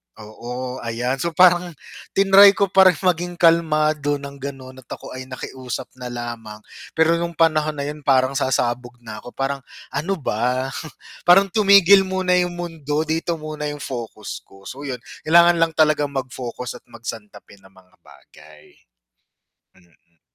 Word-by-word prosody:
Oo 125 +4 -7
ayan 120 +3 -3
so 170 +1 -3
parang 180 -2 +4 0.4
tinray 195 0 +7
ko 200 -1 0
pa 190 -1 +6
rin 180 - +4
maging 175 -1 -1
kalmado 155 -3 +2
ng 140 0 -9
ganon 130 -1 -8
at 130 - -18
ako - - -9
ay 130 0 -8
nakiusap 130 -1 -7
na 125 - -6
lamang 120 -3 -7 0.4
pero 160 +1 +3
nung 170 0 -4
panahon 155 -2 +2
na 140 - -4
yun 150 +1 -5
parang 135 -2 +2
sasabog 125 -3 -1
na 110 -1 -8
ako 125 - -13
parang 135 +1 -2 0.3
ano 160 +8 -2
ba 130 - -2 0.6
parang 195 +2 +6
tumigil 200 -2 +6
muna 185 -1 -1
yung 180 -1 -1
mundo 160 -4 -3
dito 165 +2 -2
muna 155 -1 -6
yung 145 -1 -6
focus 115 -4 -6
ko. 95 0 -18
So 140 +6 -8
yun 125 -3 -6 0.2
kailangan 170 +1 +6
lang 165 -1 +1
talagang 150 -2 +2
mag-focus 125 -1 -5
at - - -44
magsantabi 105 -3 -10
ng 95 0 -21
mga 95 0 -22
bagay. 75 0 -19 1.0
Mm. 85 -2 -29
140 Hz, 155 wpm, -21 LUFS, 125-170 Hz, 1.0 s, tinray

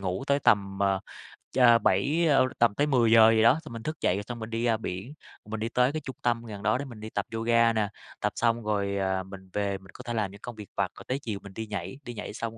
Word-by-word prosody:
ngủ 95 +5 -3
tới 140 0 +3
tầm, 100 -3 +2
ờ, 100 -1 +2 0.5
cha 120 -2 +6
7, 140 - +2
ơ, 135 -3 +5
tầm 115 -3 +4
tới 145 +1 +2
10:00 115 -4 +6
gì 110 - +3
đó, 125 +7 +5
xong 120 - -9
mình 115 - -7
thức 155 +3 -5
dậy 90 - +2
rồi 100 - -3
xong 120 +2 -7
mình 110 +1 -6
đi 115 +1 -2
ra 115 -2 +2
biển, 100 +6 -6 0.3
mình 110 0 -5
đi 115 - -2
tới 125 +2 +2
cái 155 +1 -3
trung 130 - -7
tâm 120 -1 0
gần 105 -3 -8
đó 110 +4 +2
để 140 - -4
mình 120 -5 -10
đi 110 +1 -7
tập - - -2
yoga 115 0 +3
nè, 110 -2 +1 0.3
tập - - 0
xong 115 -1 +1
rồi, 100 -2 -1
ờ, 95 -1 0
mình 95 0 -12
về 100 -1 -1
mình 95 0 -16
có - - -10
thể 120 - -4
làm 105 -4 -1
những 100 - -14
công 120 - -7
việc 105 -3 -10
vặt, - - 0
rồi - - -10
tới 130 +2 -1
chiều 110 -7 -5
mình 100 -1 -11
đi 110 +1 -5
nhảy, 105 +4 -5
đi 120 - -7
nhảy 105 -1 -6
xong 115 +1 -5
110 Hz, 280 wpm, -28 LUFS, 100-120 Hz, 0.5 s, cha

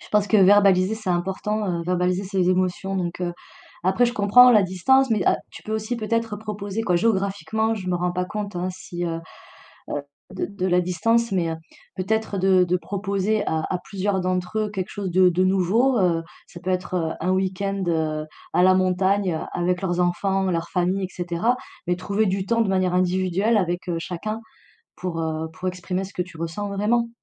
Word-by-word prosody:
Je - - -14
pense 210 -1 +3
que 215 - +3
verbaliser, 195 0 +5
c'est 215 -4 -4
important, 195 +4 -1
heu, - - -4
verbaliser 180 +2 0
ses 185 -2 +1
émotions, 185 +1 0
donc 175 0 -3
heu, 175 -1 -1 0.5
après, 220 +6 +4
je 240 - -3
comprends 245 +4 +7
la 215 -4 +6
distance, 240 +9 +3
mais 210 -4 +2
heu, - - +5 0.2
tu - - -12
peux 215 - -5
aussi 220 +2 -2
peut-être 225 -1 -1
proposer, 210 0 -4
quoi. 180 -5 +2
Géographiquement, 205 +1 0
je 190 -4 -5
me - - +1
rends 175 0 -1
pas 180 0 -1
compte, 205 -1 -5
hein, 180 +1 -1
si, 175 -1 -6
heu 165 -1 -3 0.7
heu, 145 - -2 0.3
de 185 - -2
de 200 -2 -4
la 180 0 +3
distance, 230 +6 +1
mais 175 -3 +1
heu, 160 - -3 0.4
peut-être 210 +2 -1
de 190 -1 +4
de 180 +1 +1
proposer 200 +2 -1
à 160 0 0
à 185 - 0
plusieurs 195 0 -1
d'entre 185 +3 -1
eux 215 - 0
quelque 190 -1 -4
chose 195 -3 -4
de 185 0 +5
de 180 +2 +1
nouveau. 200 +7 +3
Heu, 170 -3 +2 0.2
ça 170 - -11
peut 185 - -4
être, 185 0 -2
heu, 160 -2 0
un 180 - 0
week-end, 190 +1 -1
heu, 155 -2 0 0.3
à 180 - +4
la 185 0 +6
montagne 185 -1 +1
avec 180 +1 0
leurs 175 -1 0
enfants, 190 +2 +1
leurs 170 0 -2
familles, 185 +2 0
et - - -6
cetera, 175 +7 0 0.3
mais 180 - +2
trouver 200 +4 0
du 190 0 -1
temps, 230 0 +2
de 215 - +1
manière 185 -1 +1
individuelle, 185 +4 +1
avec, 180 -1 -1
heu, 170 - 0
chacun 215 +6 -4 0.6
pour, 175 -3 -4
heu, 160 0 -2
pour 185 - -7
exprimer 180 +1 -3
ce 195 - -10
que 180 - 0
tu 180 -2 -13
ressens 165 +5 -4
vraiment. 230 +4 +1
185 Hz, 205 wpm, -23 LUFS, 180-205 Hz, 0.7 s, comprends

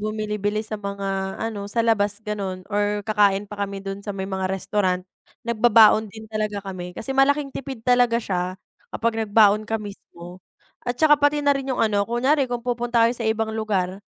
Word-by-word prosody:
bumili-bili 215 0 -2
sa 215 -1 -5
mga 195 -1 -3
ano 210 -3 -4
sa 230 +2 0
labas 205 -3 +2
ganun 195 -3 -4
or 205 0 0
kakain 205 -2 +2
pa 205 0 -9
kami 195 0 -7
dun 195 0 -5
sa 205 - -6
may 190 - -3
mga 190 -1 -2
restaurant, 185 -1 -1 0.4
nagbabaon 220 -2 +5
din 220 +2 -11
talaga 215 -2 -3
kami. 180 -2 -7
Kasi 270 +4 -4
malaking 275 +1 +2
tipid 265 -4 -7
talaga 245 -1 +4
siya 185 -5 -2 0.4
kapag 230 -1 0
nagbaon 210 0 +4
ka 225 - 0
mismo. 185 -4 -10 0.4
At 245 0 -3
'tsaka 295 0 +4
pati 290 0 +2
na 285 - +5
rin 275 -1 -4
yung 260 - -1
ano, 205 -1 0
kunyari 265 +4 +2
kung 245 -1 -4
pupunta 240 -1 +1
tayo 230 - +3
sa 240 -1 -6
ibang 220 0 -1
lugar 200 -4 -2
215 Hz, 180 wpm, -23 LUFS, 200-235 Hz, 0.4 s, nagbabaon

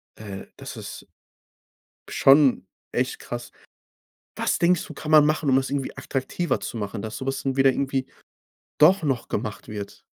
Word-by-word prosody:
äh, 100 -3 -8
das - - -8
ist - - -8 1.0
schon 135 -8 +5 0.3
echt - - -1
krass. - - -6 0.8
Was - - 0
denkst 175 0 +3
du, - - -9
kann 155 - -7
man 155 -1 +8
machen, 155 -1 +1
um 130 - +4
das 135 0 +1
irgendwie 140 -2 -3
attraktiver 135 +6 -2
zu - - -5
machen, 105 0 -4
dass 110 0 -5
so 130 - -6
was 135 0 -2
dann 135 -1 -1
wieder 135 0 +6
irgendwie 135 0 -1 0.7
doch 170 +5 +6
noch 135 -5 -1
gemacht 105 -3 -4
wird? 105 -2 -7
135 Hz, 165 wpm, -24 LUFS, 110-150 Hz, 1.0 s, man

